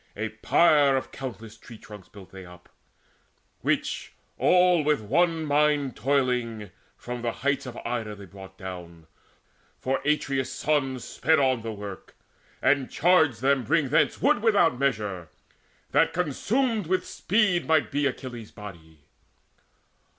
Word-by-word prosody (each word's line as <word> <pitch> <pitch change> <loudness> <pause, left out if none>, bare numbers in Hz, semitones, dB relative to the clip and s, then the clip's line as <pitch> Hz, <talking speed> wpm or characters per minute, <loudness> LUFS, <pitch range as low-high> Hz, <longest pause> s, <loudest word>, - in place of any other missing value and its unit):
A 110 +2 -3
pyre 140 +4 +3
of 130 - -5
countless 115 -5 -8
tree 115 +1 -13
trunks 105 -3 -13
built 100 -3 -14
they 95 -1 -10
up 90 0 -15 0.9
Which, - - -2 0.3
all 180 -2 +4
with 150 0 +2
one 160 +9 +1
mind 145 -2 +1
toiling, 125 -6 -1 0.3
from 125 0 -6
the 120 0 -1
heights 140 -1 0
Of 125 - -8
Ida 115 -3 -3
they 100 -1 -11
brought 95 0 -13
down; 85 -3 -9 0.7
for 130 +1 -2
Atreus' 140 -3 0
sons 135 -4 -1
Sped 160 0 +1
on 130 -4 +2
the 115 0 -5
work, 100 -2 -9 0.5
and 135 -1 +2
charged 160 -9 +3
them 135 0 +2
to 115 - -11
bring 150 -2 +2
thence 150 - +2
Wood 290 -4 +2
without 200 - +3
measure, 105 - -2 0.6
that 150 +4 +3
consumed 210 - 0
with 185 +1 0
speed 195 -4 +1
Might 160 -1 +2
be 145 0 +1
Achilles' 125 -4 -6
body. 80 -7 -12
130 Hz, 140 wpm, -26 LUFS, 105-150 Hz, 0.9 s, all